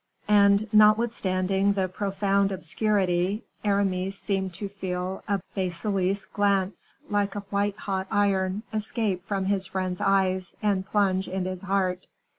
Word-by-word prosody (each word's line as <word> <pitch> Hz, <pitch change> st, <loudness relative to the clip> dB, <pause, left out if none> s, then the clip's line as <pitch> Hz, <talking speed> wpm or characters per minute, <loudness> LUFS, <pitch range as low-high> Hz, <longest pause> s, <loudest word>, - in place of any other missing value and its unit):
And 200 Hz, +1 st, +5 dB
notwithstanding 200 Hz, -3 st, +3 dB
the 190 Hz, -2 st, 0 dB
profound 195 Hz, +1 st, 0 dB
obscurity, 190 Hz, +1 st, 0 dB, 0.2 s
Aramis 195 Hz, -2 st, 0 dB
seemed 190 Hz, -2 st, -2 dB
to 200 Hz, -, -4 dB
feel 185 Hz, -1 st, -4 dB
a 200 Hz, -1 st, +1 dB
basilisk 190 Hz, +1 st, -1 dB
glance, 200 Hz, -1 st, 0 dB
like 205 Hz, -1 st, 0 dB
a 205 Hz, -, -3 dB
white 200 Hz, 0 st, 0 dB
hot 190 Hz, -2 st, -3 dB
iron, 195 Hz, 0 st, +1 dB
escape 215 Hz, -3 st, -1 dB
from 195 Hz, -2 st, -1 dB
his 190 Hz, -1 st, 0 dB
friend's 185 Hz, -1 st, -3 dB
eyes, 190 Hz, -2 st, +1 dB
and 195 Hz, -3 st, 0 dB
plunge 190 Hz, -2 st, +1 dB
into 185 Hz, 0 st, -2 dB
his 185 Hz, -1 st, -6 dB
heart. 190 Hz, -2 st, -1 dB
195 Hz, 130 wpm, -26 LUFS, 185-205 Hz, 0.2 s, And